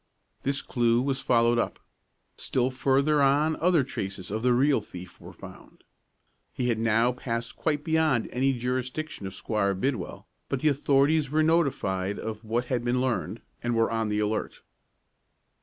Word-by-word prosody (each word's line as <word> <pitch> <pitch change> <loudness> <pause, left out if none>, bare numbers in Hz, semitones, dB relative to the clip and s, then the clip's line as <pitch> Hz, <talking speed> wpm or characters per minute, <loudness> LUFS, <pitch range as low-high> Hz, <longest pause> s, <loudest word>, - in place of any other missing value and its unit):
This 140 +1 -1
clew 120 -2 +2
was 135 +1 -1
followed 120 -1 +3
up. - - -1 0.6
Still 130 0 -1
farther 140 +3 +2
on 145 +3 +3
other 170 -4 +3
traces 95 -7 -5
of 110 +1 -2
the 125 +1 +3
real 135 +1 +3
thief 90 -3 -11
were - - -10
found. - - -14 0.7
He 125 -1 -2
had 115 -2 0
now 115 +2 +3
passed 120 -2 -4
quite 150 -2 -1
beyond 160 -7 +1
any 135 +2 +2
jurisdiction 125 0 -3
of 95 - -8
Squire 100 -2 0
Bidwell, 115 -1 -3 0.2
but 135 - -2
the 155 - +4
authorities 140 +1 +2
were 155 +2 +2
notified 105 - +1
of 110 0 -6
what 115 +3 -1
had 125 -1 -1
been 125 +1 +1
learned, 115 -4 -2 0.2
and 120 0 -1
were 115 0 +2
on 115 -1 -1
the 105 - -1
alert. 105 +1 -2
125 Hz, 160 wpm, -27 LUFS, 110-140 Hz, 0.7 s, the